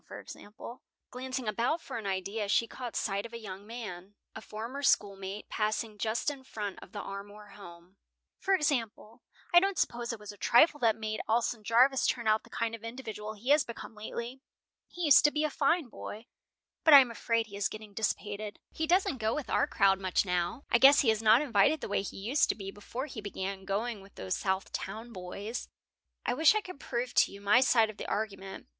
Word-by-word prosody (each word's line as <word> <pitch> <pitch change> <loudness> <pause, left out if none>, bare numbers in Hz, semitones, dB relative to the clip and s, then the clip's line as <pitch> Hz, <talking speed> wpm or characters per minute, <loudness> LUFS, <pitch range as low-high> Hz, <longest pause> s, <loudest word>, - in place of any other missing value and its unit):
For - - -8
example," 220 +4 -11 0.3
glancing 255 -1 -4
about 235 +10 0
for 235 - -6
an 210 - -6
idea, 200 +3 -2
she 230 - +3
caught 245 0 -7
sight 200 0 -1
of 235 - -10
a - - -4
young 200 -2 -9
man, 205 -5 -8 0.2
a 220 - -8
former 230 +7 -6
schoolmate, 200 -5 0
passing 215 0 -2
just 225 +7 0
in 275 -2 -10
front 210 -6 -5
of - - -13
the - - -6
Armour 205 +1 -9
home, 180 -1 -14 0.4
"for 390 0 +2
example, 235 - -2 0.3
I 345 - +10
don't 390 +1 0
suppose 240 0 -1
it 230 - -6
was 210 -1 -8
a 205 - -14
trifle 295 - +5
that 225 -4 +3
made 215 -1 -3
Alson 230 0 +1
Jarvis 250 +5 +4
turn 235 -3 -1
out 215 0 +4
the - - -18
kind 230 0 -2
of 230 -1 -8
individual 220 -3 -6
he 230 +6 -7
has 295 0 +6
become 235 -1 -9
lately. 235 +4 -6 0.5
He 355 - -7
used 290 -6 +7
to - - +7
be 300 +1 -1
a 305 - 0
fine 315 +1 +1
boy, 220 -1 -8 0.6
but 310 -3 +9
I - - +13
am 255 -3 +3
afraid 230 0 0
he 200 -2 -11
is 200 -1 0
getting 215 -1 -10
dissipated. 210 0 -3
He 320 - -2
doesn't 345 -6 +2
go 220 0 0
with 300 -3 -5
our 285 - +2
crowd 195 -7 +3
much 190 +1 +1
now. 180 +7 -1
I 235 - +5
guess 280 +3 +8
he 235 -6 +4
is 220 0 -1
not 225 +5 +6
invited 240 +3 +3
the - - -5
way 200 - 0
he 195 - -7
used 235 +9 +1
to - - +1
be 195 -2 -7
before 235 +6 -6
he 255 -7 -7
began 195 -1 -5
going 210 +2 -2
with 195 +1 -17
those 95 -1 -2
South 190 0 -2
Town 225 +5 -6
boys." 200 +5 -6 0.6
"I - - +1
wish 315 - +5
I 430 - +2
could 365 -7 -10
prove 245 -1 -3
to - - +4
you 200 - -10
my 205 +4 +4
side 230 -4 +4
of 215 - -20
the - - -6
argument. 195 -3 -4
220 Hz, 215 wpm, -30 LUFS, 205-255 Hz, 0.6 s, I